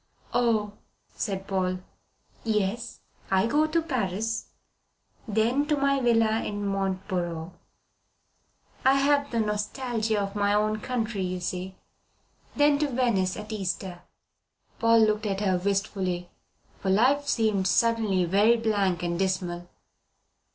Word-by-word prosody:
"Oh!" 220 Hz, -4 st, +2 dB, 0.4 s
said 195 Hz, -3 st, -3 dB
Paul. 185 Hz, -1 st, -1 dB, 0.7 s
"Yes. 220 Hz, +1 st, -1 dB, 0.3 s
I 190 Hz, +1 st, +3 dB
go 295 Hz, +6 st, +2 dB
to 330 Hz, +1 st, 0 dB
Paris, 225 Hz, -, -2 dB, 0.8 s
then 230 Hz, +7 st, +1 dB
to 300 Hz, -1 st, +1 dB
my 275 Hz, 0 st, +2 dB
villa 235 Hz, -3 st, +3 dB, 0.2 s
at -, -, -3 dB
Mont 195 Hz, -1 st, -2 dB
Boron. 175 Hz, -3 st, -3 dB, 1.3 s
I 265 Hz, +1 st, +5 dB
have 285 Hz, +1 st, +2 dB
the 230 Hz, -, -1 dB
nostalgia 220 Hz, +1 st, -1 dB
of 195 Hz, -1 st, -3 dB
my 205 Hz, 0 st, +2 dB
own 215 Hz, +1 st, +1 dB
country, 225 Hz, -4 st, -2 dB
you 185 Hz, 0 st, -2 dB
see. 180 Hz, +2 st, -4 dB, 0.8 s
Then 290 Hz, 0 st, +4 dB
to 300 Hz, -, +2 dB
Venice 235 Hz, -8 st, 0 dB
at 210 Hz, +1 st, -7 dB
Easter." 185 Hz, -3 st, -4 dB, 0.8 s
Paul 230 Hz, 0 st, +5 dB
looked 215 Hz, 0 st, 0 dB
at 195 Hz, 0 st, -2 dB
her 190 Hz, -3 st, +1 dB
wistfully, 190 Hz, -2 st, -2 dB, 0.5 s
for 190 Hz, -, -2 dB
life 260 Hz, +9 st, +3 dB
seemed 215 Hz, -6 st, +1 dB
suddenly 215 Hz, -3 st, +2 dB
very 205 Hz, +7 st, +4 dB
blank 200 Hz, -6 st, 0 dB
and 170 Hz, 0 st, -1 dB
dismal. 180 Hz, -2 st, -2 dB
210 Hz, 125 wpm, -27 LUFS, 190-235 Hz, 1.3 s, I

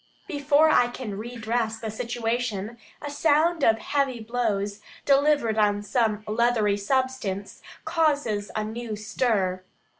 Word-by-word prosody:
Before 290 Hz, +1 st, +3 dB
I 245 Hz, -, +5 dB
can 245 Hz, -4 st, -6 dB
redress 225 Hz, 0 st, -2 dB
the 220 Hz, -1 st, -4 dB
situation, 230 Hz, -1 st, -3 dB, 0.2 s
a 290 Hz, -, -4 dB
sound 315 Hz, +2 st, +2 dB
of 225 Hz, 0 st, +5 dB
heavy 270 Hz, 0 st, -1 dB
blows, 215 Hz, -3 st, -2 dB, 0.2 s
delivered 280 Hz, -6 st, +3 dB
on 205 Hz, -1 st, +2 dB
some 215 Hz, -1 st, 0 dB
leathery 220 Hz, -2 st, +2 dB
substance, 210 Hz, -3 st, -2 dB, 0.2 s
causes 290 Hz, -, 0 dB
a 215 Hz, -, 0 dB
new 220 Hz, +1 st, -5 dB
stir. 205 Hz, -4 st, 0 dB
230 Hz, 120 wpm, -25 LUFS, 210-265 Hz, 0.2 s, I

